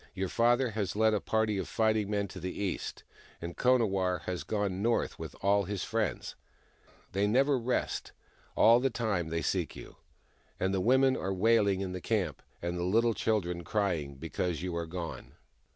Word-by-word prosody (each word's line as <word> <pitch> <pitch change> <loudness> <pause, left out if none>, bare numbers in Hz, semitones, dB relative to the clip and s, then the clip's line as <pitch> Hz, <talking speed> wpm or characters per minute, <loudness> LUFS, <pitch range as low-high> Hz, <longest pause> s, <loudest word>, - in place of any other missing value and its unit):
Your 95 -1 -2
father 120 +1 +3
has 100 -4 -2
led 110 0 +3
a 105 - +2
party 110 -2 0
of - - -3
fighting 110 -2 +1
men 100 -1 0
to 90 - -8
the 90 +1 -4
east, 100 -3 -3 0.4
and 85 0 -6
Konawarr 100 -8 +2
has 90 -1 -3
gone 100 -3 -1
north 115 +2 0
with - - -7
all 100 +1 +3
his 100 0 -3
friends. 115 +1 -2 0.8
They 100 +2 +1
never 135 +6 +3
rest 120 +2 -2 0.2
— - - -32
all 115 +2 +7
the 135 +2 +1
time 110 -8 -1
they 80 +1 -2
seek 90 -6 -1
you. - - -11 0.6
And 95 +1 0
the 95 - +1
women 130 +4 +4
are 95 - -2
wailing 100 -1 +3
in 95 -2 -3
the 90 -1 -5
camp, - - -1 0.2
and 85 0 -2
the - - -1
little 115 +6 +3
children 90 -7 -1
crying, 85 -9 -1
because 80 +3 -3
you 90 -2 -3
are 85 -1 -3
gone." 85 0 -6
100 Hz, 185 wpm, -30 LUFS, 90-110 Hz, 0.8 s, all